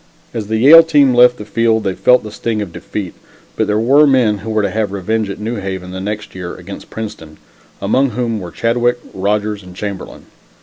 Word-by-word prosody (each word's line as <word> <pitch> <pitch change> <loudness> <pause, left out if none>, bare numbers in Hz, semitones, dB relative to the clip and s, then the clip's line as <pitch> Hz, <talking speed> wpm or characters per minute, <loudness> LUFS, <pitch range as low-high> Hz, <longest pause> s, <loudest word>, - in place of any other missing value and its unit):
As 110 -3 -4
the 110 +1 -1
Yale 145 +8 +9
team 145 -5 +3
left 125 0 +5
the 105 - -8
field, 110 0 +1
they 95 -2 -1
felt 125 +6 +3
the 105 - -8
sting 110 0 -3
of 100 -5 -5
defeat, 100 -4 -6 0.4
but 110 - 0
there 105 0 +1
were 140 +7 +4
men 120 -7 +2
who 110 +4 -7
were 110 -1 0
to 100 - 0
have 110 -1 -1
revenge 105 +2 -2
at 100 - -5
New 110 +2 -3
Haven 95 -2 -5
the 95 0 -6
next 105 +2 -5
year 90 -2 -6
against 95 +2 -10
Princeton, 105 -9 -8 0.4
among 130 +7 +1
whom 115 -1 -2
were 90 -3 -7
Chadwick, 120 +4 0 0.2
Rodgers 105 +2 -1
and 90 -1 -13
Chamberlain. 100 -1 -7
105 Hz, 210 wpm, -16 LUFS, 100-115 Hz, 0.4 s, Yale